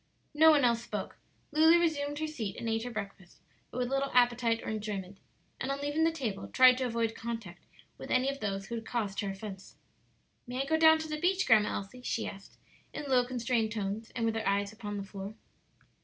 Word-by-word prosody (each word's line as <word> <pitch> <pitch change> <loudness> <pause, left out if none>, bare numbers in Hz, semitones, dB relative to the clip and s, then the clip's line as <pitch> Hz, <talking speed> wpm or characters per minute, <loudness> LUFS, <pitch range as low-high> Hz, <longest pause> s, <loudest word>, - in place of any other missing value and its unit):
No 315 +2 +7
one 290 -4 +5
else 235 -1 +2
spoke. - - -5 0.3
Lulu 320 +3 +6
resumed 290 -4 0
her 315 - -1
seat 225 -11 -4
and 230 - -5
ate 225 0 0
her - - -3
breakfast, 200 -5 -7 0.3
but - - -8
with 250 -1 0
little 275 +1 0
appetite 240 -2 +3
or - - -4
enjoyment; 205 -3 -4 0.4
and 265 - -2
on 275 - -2
leaving 290 +3 +1
the 330 - +3
table 240 -11 -4
tried 255 0 +6
to 260 - 0
avoid 230 -2 -1
contact 225 -7 -7 0.3
with - - -8
any 255 +1 +2
of 275 0 -2
those 195 -3 -3
who 235 - -8
had 230 -1 -3
caused 210 -5 -3
her 200 - -1
offence. 195 -1 -8 0.7
"May 250 +2 -2
I - - -7
go 320 - +1
down 320 0 +7
to 315 0 -5
the 305 0 -4
beach, 375 +2 +2
Grandma 215 -3 +4
Elsie?" 200 +6 -7
she - - -2
asked, 195 0 -10 0.3
in - - -6
low, 250 -1 +5
constrained 235 -3 0
tones, 210 +1 -3
and 230 -2 0
with 225 - +1
her 220 -2 -2
eyes 200 +1 0
upon 205 -1 -6
the 200 - -4
floor. 195 +1 -8
235 Hz, 215 wpm, -31 LUFS, 205-275 Hz, 0.7 s, No